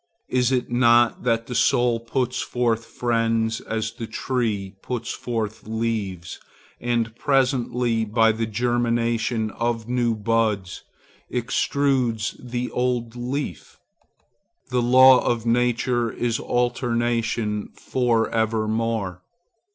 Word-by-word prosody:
Is 125 0 +2
it 125 -2 0
not 120 -1 +4
that 115 -1 +1
the 125 - -6
soul 120 0 +2
puts 125 +1 -2
forth 115 -2 -1
friends 115 -2 0
as 110 0 -3
the 115 -1 -7
tree 110 -5 -2
puts 120 -2 -4
forth 110 -3 -4
leaves, 110 -6 -3 0.4
and 115 -2 -1
presently, 125 -4 +1
by 110 +1 +3
the 110 +1 -2
germination 115 -1 0
of 115 -1 -2
new 120 -2 +1
buds, 110 -3 0 0.5
extrudes 125 -2 0
the 125 0 -4
old 125 -2 -1
leaf? 125 +4 -5 0.9
The 125 -1 +1
law 130 +1 +7
of 120 -1 0
nature 120 0 +1
is 115 -2 -1
alternation 120 -3 -1
for 120 -3 +1
evermore. 110 -3 -1
115 Hz, 105 wpm, -23 LUFS, 115-125 Hz, 0.9 s, law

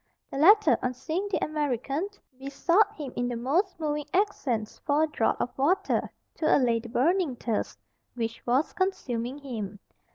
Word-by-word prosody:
The - - -4
latter, 415 +7 +6
on 255 0 -1
seeing 340 +10 -3
the 400 - 0
American, 295 - -2 0.3
besought 340 +9 +2
him 285 -5 -6
in 245 - -1
the 245 - -3
most 325 - 0
moving 300 -2 -2
accents 265 - 0
for 295 +1 +2
a - - +2
draught 265 -7 0
of 245 - -2
water 375 +8 +1 0.3
to 310 - +4
allay 240 -4 +2
the 235 +1 -9
burning 315 +4 +1
thirst 230 -2 -2 0.4
which 230 -1 -4
was 260 +6 +2
consuming 260 -10 -2
him. 220 -8 -6
280 Hz, 160 wpm, -27 LUFS, 245-340 Hz, 0.4 s, latter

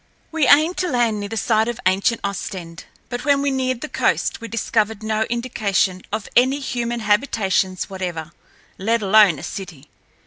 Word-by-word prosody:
We 320 -3 +1
aimed 310 +5 +5
to 365 - 0
land 235 -5 +1
near 205 0 -5
the 225 - -4
site 220 +1 +2
of 240 0 -4
ancient 195 +5 +2
Ostend. 180 -4 -5 0.2
But 245 0 -4
when 280 -1 +2
we 285 - +1
neared 255 -2 -1
the 310 - -4
coast - - 0
we 230 - -6
discovered 220 -1 -1
no 220 0 0
indication 210 -6 0
of 215 -1 -3
any 260 +3 +4
human 240 -3 -3
habitations 205 -4 +1
whatever, 175 -4 -5 0.5
let 225 +3 0
alone 200 -4 +5
a - - -9
city. 165 -7 -8
220 Hz, 170 wpm, -21 LUFS, 195-245 Hz, 0.5 s, aimed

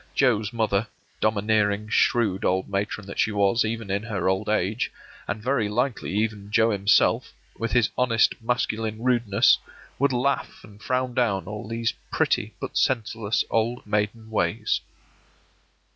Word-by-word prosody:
Joe's 110 -5 +2
mother, 110 -2 0 0.3
domineering, 105 -1 +1
shrewd 110 -5 +2
old 95 +1 +1
matron 100 +1 -3
that 100 - -8
she 110 - +2
was 100 +3 +2
even 110 -2 -3
in 100 +1 0
her 105 -6 -2
old 95 +3 0
age, 105 +1 0 0.4
and 105 +1 -4
very 120 -5 +1
likely 125 +3 -1
even 105 -1 -1
Joe 115 +1 +3
himself, 100 0 +2 0.3
with 115 -1 -2
his 120 -2 +3
honest 115 -3 +3
masculine 115 -1 -2
rudeness, 120 -5 +4 0.4
would 140 +1 +3
laugh 130 +2 -1
and 105 +1 -15
frown 130 -1 -1
down 110 -6 +1
all 105 +2 -6
these 115 0 -1 0.2
pretty - - 0
but - - -4
senseless 115 -3 0
old 115 +2 0
maiden 105 +2 -2
ways. 85 -6 0
110 Hz, 145 wpm, -25 LUFS, 100-115 Hz, 0.4 s, rudeness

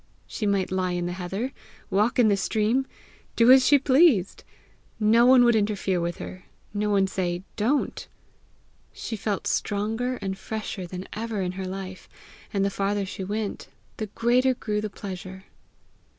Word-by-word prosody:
She 215 - -3
might 195 -2 0
lie 185 -1 0
in 175 0 -2
the 175 - -2
heather, 190 +8 -4 0.4
walk 210 +4 +2
in 240 -3 +5
the 205 - +4
stream, 220 +6 0 0.5
do 235 +2 +6
as 260 0 +8
she 290 - +7
pleased! 265 - +3 0.6
No 230 +3 +5
one 255 -1 +7
would 235 -1 +5
interfere 205 -4 0
with 170 0 -2
her, 185 0 -9 0.3
no 210 0 -1
one 200 -2 +3
say 180 -2 -2
Don't! 250 +8 0 0.9
She 225 - -5
felt 205 -1 -3
stronger 225 +5 -1
and 195 -4 -5
fresher 210 -4 -5
than 185 +2 -7
ever 220 -2 -3
in 180 - -2
her 185 0 -5
life; 185 0 -7 0.4
and 195 -1 +1
the 200 - 0
farther 200 +1 -1
she 190 0 -6
went, 205 +1 -4 0.3
the 215 - -3
greater 245 +5 +2
grew 210 -3 -2
the 215 - -3
pleasure. 190 -1 -8
205 Hz, 165 wpm, -25 LUFS, 190-230 Hz, 0.9 s, as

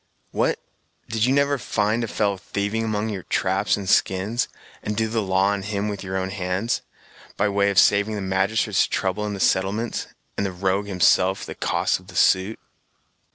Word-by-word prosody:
"What! - - +1 0.5
did 110 0 +1
you 130 - +2
never 140 -1 +2
find 105 +1 0
a - - -2
fellow 100 -2 0
thieving 100 +4 -2
among 110 0 -1
your 100 -3 -4
traps - - 0
and 100 -2 -6
skins, 100 +6 +2 0.3
and 105 0 -3
do 110 0 +1
the 110 0 -1
law 95 0 +2
on 100 -1 -1
him 100 +1 -2
with 100 -1 -5
your 95 0 -3
own 95 0 -2
hands, 95 +3 -1 0.6
by 105 - +2
way 100 0 +2
of 100 - -2
saving 105 +3 +4
the 105 - -3
magistrates 95 +2 +1
trouble 100 +3 -1
in 105 - -3
the - - -7
settlements, 100 +6 0 0.3
and - - 0
the - - -4
rogue 95 +2 -1
himself 95 0 +3
the - - -6
cost - - 0
of 90 - -19
the 95 - -12
suit!" 95 +3 +3
100 Hz, 190 wpm, -23 LUFS, 95-110 Hz, 0.6 s, saving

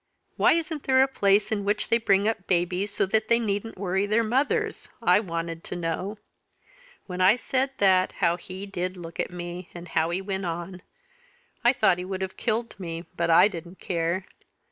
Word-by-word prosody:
'Why - - +5
isn't 320 -2 -2
there 260 0 +5
a - - +2
place 200 -5 +2
in 205 -2 0
which 205 +1 -1
they 230 - +4
bring 200 -2 +3
up 220 -4 -2
babies 180 +3 0
so - - +1
that 215 +3 0
they 235 - +4
needn't 215 -1 -2
worry 190 +1 0
their 215 +3 +2
mothers?' 255 +6 0
I - - +4
wanted 165 -4 -4
to - - -5
know. 175 +5 -3 0.9
When 180 -1 -4
I 190 +4 +6
said 260 +2 0
that, 185 -2 +3
how 170 +1 +1
he 185 +2 -8
did 185 -1 -4
look 170 -1 -9
at - - 0
me, 175 0 -7
and 175 +1 -9
how 160 +1 +1
he 175 +2 -1
went 195 -1 -3
on! 175 +2 -5 0.8
I 240 - +6
thought 195 -8 +3
he 180 - -4
would 190 0 -3
have 190 - -5
killed 230 -1 -2
me 170 -2 -5
but 170 0 0
I 165 +4 +7
didn't 175 -2 -8
care. 170 +1 -1
190 Hz, 195 wpm, -26 LUFS, 175-215 Hz, 0.9 s, I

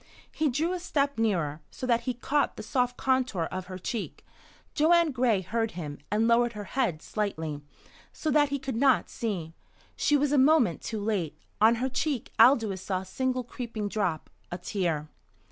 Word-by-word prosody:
He 310 -1 0
drew 315 +8 0
a 365 - -2
step 280 -7 -1
nearer, 165 -9 0
so - - -6
that 235 -2 +2
he 250 - -1
caught 285 +4 0
the - - -6
soft 250 -1 0
contour 255 -9 +1
of 185 0 -5
her 185 0 -6
cheek. 215 +4 -5 0.5
Joanne 335 +1 +4
Gray 240 -6 +2
heard 225 +4 -2
him, 145 -4 -5
and 215 +3 +2
lowered 235 0 +3
her 210 -1 -6
head 200 -8 -1
slightly, 160 -8 -3 0.5
so 310 - -2
that 290 0 +4
he 280 - -1
could 270 -3 -4
not 265 -1 +3
see. 180 -8 -3 0.4
She 295 - +3
was 285 0 +1
a 290 - +4
moment 265 - +4
too 215 -3 -4
late. 200 -8 -1 0.2
On 225 +2 +6
her 250 +3 -1
cheek 265 -1 -2
Aldous 225 -6 +5
saw 185 -1 -2
a - - -10
single 255 +5 -1
creeping 230 -3 -5
drop 195 -7 -2 0.2
a 175 - -3
tear. 175 -5 -2
230 Hz, 180 wpm, -28 LUFS, 190-265 Hz, 0.5 s, On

